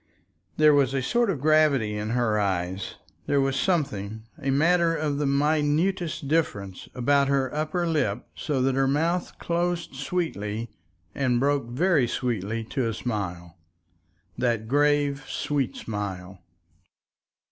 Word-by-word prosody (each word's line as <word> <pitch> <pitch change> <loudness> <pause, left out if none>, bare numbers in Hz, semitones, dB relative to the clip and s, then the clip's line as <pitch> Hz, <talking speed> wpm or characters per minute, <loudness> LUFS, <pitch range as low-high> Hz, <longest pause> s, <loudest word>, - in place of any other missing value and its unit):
There 155 -1 +6
was 140 -2 +3
a 135 - +1
sort 235 - +2
of 170 -8 -1
gravity 145 -7 +3
in 105 +1 -3
her 115 -3 +1
eyes. 95 -1 -2 0.3
There 140 - +2
was 135 0 +1
something, 130 - -1 0.2
a 135 - -1
matter 165 +4 +3
of 150 -3 -1
the 145 - +1
minutest 150 +3 +1
difference, 100 - -1
about 140 +2 +3
her 135 -2 +1
upper 155 +4 -1
lip 135 -10 0
so 135 -4 -1
that 135 0 +2
her 135 +1 +2
mouth 165 +6 0
closed 175 -1 -1
sweetly 120 - -3 0.4
and 125 -3 +1
broke 140 -2 +1
very 145 0 +2
sweetly 115 -2 -2
to 130 -4 0
a 110 - -3
smile. 90 -7 -4 0.8
That 115 -3 0
grave, 145 +1 +2
sweet 140 -4 -1
smile! 95 -4 -5
135 Hz, 135 wpm, -26 LUFS, 110-155 Hz, 0.8 s, There